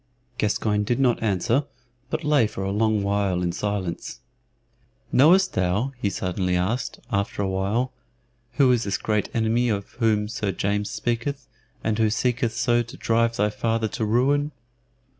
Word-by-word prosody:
Gascoyne 105 0 +1
did 120 +5 0
not 125 -3 +2
answer, 115 +6 +1 0.4
but 155 +2 -2
lay 145 -6 +3
for 95 - -6
a 95 - -1
long 110 0 +1
while 100 -3 0
in 85 - 0
silence. 95 -2 -3 0.9
"Knowest 180 +8 +5
thou," 95 +8 0
he 100 - +1
suddenly 90 -1 -1
asked, 110 +7 -1
after 100 -1 -1
a - - 0
while, 100 +7 -1 0.6
"who 130 -1 +4
is 120 -2 +2
this 100 - -1
great 105 -1 -1
enemy 115 +2 +1
of 100 -2 -2
whom 110 -3 +2
Sir 105 -3 -2
James 100 +2 -1
speaketh, 120 +3 -2 0.4
and 110 0 0
who 110 -1 +3
seeketh 120 +1 0
so 120 -1 +2
to 115 -1 -9
drive 115 0 +1
thy 105 0 +1
father 115 0 0
to 110 - -3
ruin?" 135 +7 +2
110 Hz, 160 wpm, -24 LUFS, 100-120 Hz, 0.9 s, Knowest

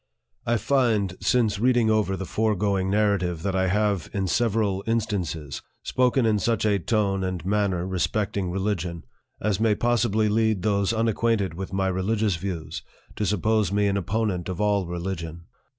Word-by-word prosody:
I 120 0 +3
FIND, 110 -5 +1
since 105 +1 +2
reading 120 -1 +3
over 105 -3 +1
the 95 - -4
foregoing 100 -2 0
Narrative 95 -5 +1
that 100 -1 -1
I 95 0 +2
have, 100 -2 0
in 95 -1 0
several 105 0 +1
instances, 90 -10 -2 0.2
spoken 125 0 +2
in 110 -2 +2
such 115 +3 0
a 100 -2 +2
tone 100 -1 0
and 90 -3 -3
manner, 100 -3 0
respecting 95 +1 -1
religion, 90 -3 -2 0.4
as 105 -2 0
may 110 -1 +3
possibly 110 -2 +1
lead 110 -2 +1
those 100 -2 +1
unacquainted 115 -4 +1
with 95 +3 -6
my 95 0 0
religious 100 +2 0
views 85 -3 -5 0.3
to 105 - -1
suppose 105 +2 +1
me 100 0 +2
an 100 -1 +1
opponent 100 -2 -1
of 90 - -4
all 100 -3 +1
religion. 85 -2 -5
100 Hz, 155 wpm, -25 LUFS, 95-110 Hz, 0.4 s, I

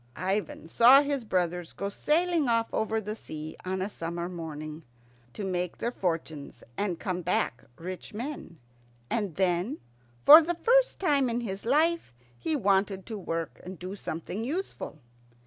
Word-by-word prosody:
Ivan 190 -2 -2
saw 250 - +7
his 280 -3 -1
brothers 180 -4 -1
go 200 - -3
sailing 320 - +1
off 230 -1 +1
over 220 0 0
the 210 0 -4
sea 155 -6 -7
on 185 0 -2
a - - -1
summer 170 -3 -4
morning, 155 -3 -6 0.5
to 210 - -4
make 180 -2 -2
their 235 - -2
fortunes 165 -8 -4
and 185 -5 -2
come 180 -1 -2
back 165 -8 0
rich 185 +2 -7
men; 235 - -6 0.5
and 205 -8 -1
then, 190 - +1 0.5
for 310 +3 +11
the 345 +2 -1
first - - +3
time 285 -8 +2
in 235 +1 -1
his 200 -1 -5
life, 315 - +2 0.2
he 315 - -1
wanted 195 -5 +1
to 220 - -5
work 165 -3 -4
and 185 0 -8
do 185 +3 -6
something 185 +3 -5
useful. 315 - -4
195 Hz, 155 wpm, -28 LUFS, 175-255 Hz, 0.5 s, for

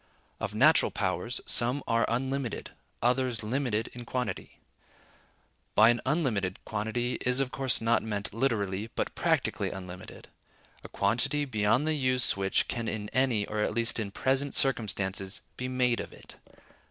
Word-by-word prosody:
Of - - -4
natural - - +5
powers, 120 +8 -2
some 125 +4 0
are 115 0 +2
unlimited, 130 +1 -2 0.3
others 125 -2 +1
limited 115 -1 -1
in 120 - -7
quantity. 125 +1 -4 1.2
By 110 +1 +7
an 120 - -1
unlimited 120 - 0
quantity 110 +3 -2
is 125 +1 +2
of 135 -2 +1
course 135 -2 +1
not 115 0 +3
meant 105 -3 -3
literally, 110 -4 -1
but - - -2
practically - - 0
unlimited: 90 -1 -9 0.6
a - - -9
quantity 125 +8 +1
beyond 110 +2 +2
the 155 - +2
use 130 -4 +3
which 95 0 +1
can 115 -1 -3
in 105 -1 -3
any, 125 -5 +2
or 105 +1 -4
at 105 - 0
least 115 0 +1
in 105 -3 -2
present 135 +6 0
circumstances, 100 -6 0
be 125 - -4
made 125 -2 +1
of - - -6
it. - - -15
115 Hz, 150 wpm, -29 LUFS, 105-130 Hz, 1.2 s, By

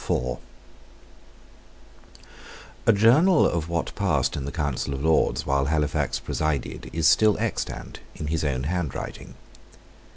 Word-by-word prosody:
A - - +8
journal 135 - +5
of 85 -1 -1
what 85 -1 -2
passed - - 0
in 70 - -4
the 70 - -4
Council 70 -3 -2
of 70 - -5
Lords 80 0 +2
while 70 0 +1
Halifax 75 0 0
presided 75 -4 -3
is 80 -1 +1
still 110 -2 +4
extant - - -4 0.2
in - - -6
his 80 +1 -1
own 65 -3 -1
handwriting. 85 -1 -4
80 Hz, 120 wpm, -25 LUFS, 70-90 Hz, 0.2 s, A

